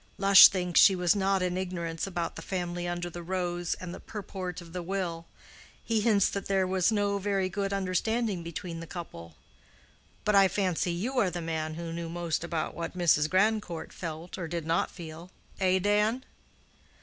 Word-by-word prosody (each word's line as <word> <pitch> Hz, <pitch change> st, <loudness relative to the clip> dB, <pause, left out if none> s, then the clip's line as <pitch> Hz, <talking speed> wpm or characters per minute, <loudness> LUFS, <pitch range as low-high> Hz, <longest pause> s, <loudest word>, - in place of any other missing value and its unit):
Lush 195 Hz, -1 st, +10 dB
thinks 180 Hz, -3 st, +1 dB
she 195 Hz, -, +7 dB
was 180 Hz, -1 st, +2 dB
not 195 Hz, -1 st, +1 dB
in 180 Hz, 0 st, -1 dB
ignorance 170 Hz, -2 st, -3 dB
about 175 Hz, -3 st, -3 dB
the -, -, -7 dB
family 175 Hz, -2 st, -3 dB
under 175 Hz, 0 st, -3 dB
the 175 Hz, 0 st, -7 dB
rose, 175 Hz, -1 st, -2 dB
and 180 Hz, -1 st, -7 dB
the -, -, -8 dB
purport 190 Hz, -4 st, -6 dB
of 170 Hz, -1 st, -12 dB
the 180 Hz, -, -3 dB
will. 170 Hz, -2 st, -3 dB, 0.6 s
He 225 Hz, -2 st, 0 dB
hints 205 Hz, -3 st, +4 dB
that 200 Hz, -, -4 dB
there 195 Hz, -1 st, +2 dB
was 185 Hz, +2 st, +2 dB
no 205 Hz, -1 st, +1 dB
very 195 Hz, -1 st, 0 dB
good 200 Hz, 0 st, -2 dB
understanding 195 Hz, +2 st, 0 dB
between 170 Hz, 0 st, -6 dB
the 165 Hz, -, -8 dB
couple. 85 Hz, -, -8 dB, 0.9 s
But 210 Hz, -, +2 dB
I 195 Hz, -1 st, +7 dB
fancy 185 Hz, -3 st, 0 dB
you 235 Hz, +10 st, -1 dB
are 200 Hz, -6 st, +3 dB
the 175 Hz, -, -5 dB
man 160 Hz, -1 st, -3 dB
who 165 Hz, 0 st, -5 dB
knew 170 Hz, 0 st, -5 dB
most 170 Hz, -1 st, -2 dB
about 165 Hz, -2 st, -3 dB
what 170 Hz, +2 st, -5 dB
Mrs. 155 Hz, -3 st, +3 dB
Grandcourt 195 Hz, -2 st, 0 dB
felt 165 Hz, +1 st, -6 dB
or 170 Hz, -, -3 dB
did 165 Hz, -1 st, -4 dB
not 165 Hz, +1 st, +1 dB
feel—eh, 180 Hz, +2 st, -3 dB
Dan?" 210 Hz, +6 st, +1 dB
180 Hz, 180 wpm, -29 LUFS, 170-195 Hz, 0.9 s, Lush